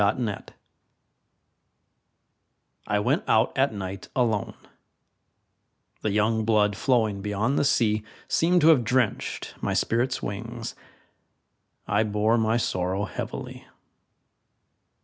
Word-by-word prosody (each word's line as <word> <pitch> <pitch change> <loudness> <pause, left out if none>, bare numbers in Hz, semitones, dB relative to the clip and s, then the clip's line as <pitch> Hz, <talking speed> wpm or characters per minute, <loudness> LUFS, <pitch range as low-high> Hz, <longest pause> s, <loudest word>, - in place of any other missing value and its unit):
Winter 105 +2 +1
Stars - - -11 2.4
I 105 - +1
went 120 +9 +1
out 110 +2 +3
at 135 -1 +2
night 95 -2 -6
alone; 115 -5 0 1.5
The 110 - 0
young 110 +2 +1
blood 105 -2 +2
flowing 110 -4 +1
beyond 105 +7 0
the - - +2
sea 110 -6 +2 0.2
Seemed 175 +2 +3
to 155 - +6
have 145 -7 +5
drenched 125 -1 -1
my - - -1
spirit's 120 +3 0
wings 115 +3 -5 1.1
I 105 +2 +2
bore 110 +2 +2
my 110 +1 +2
sorrow 95 -2 -1
heavily. 85 - -7
110 Hz, 110 wpm, -26 LUFS, 105-120 Hz, 2.4 s, to